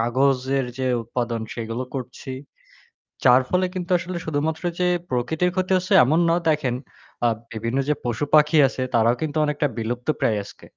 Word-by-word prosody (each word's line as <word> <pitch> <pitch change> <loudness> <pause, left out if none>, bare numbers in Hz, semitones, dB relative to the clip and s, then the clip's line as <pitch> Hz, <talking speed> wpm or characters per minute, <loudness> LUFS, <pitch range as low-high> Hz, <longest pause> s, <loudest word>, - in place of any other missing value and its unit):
কাগজের 130 +2 +1
যে 130 - -1 0.2
উৎপাদন 120 0 -3
সেগুলো 115 +2 -4
করছি। 130 0 -6 0.9
যার 125 +1 +6
ফলে 185 0 +2
কিন্তু 180 0 -4
আসলে 175 0 -5
শুধুমাত্র 160 +2 -2 0.2
যে 180 - +2 0.2
প্রকৃতির 155 +8 0
ক্ষতি 185 0 -1
হচ্ছে 185 0 -1
এমন 155 +6 +2
না। 165 - +4
দেখেন, 135 -5 +1 0.5
আ - - +6 0.2
বিভিন্ন 115 +3 -3
যে - - +4
পশুপাখি 150 +6 +3
আছে 130 - -5
তারাও 115 +1 +4
কিন্তু 155 -1 -2
অনেকটা 150 0 0
বিলুপ্তপ্রায় 120 0 -1
আজকে। - - -14
135 Hz, 150 wpm, -23 LUFS, 120-160 Hz, 0.9 s, যার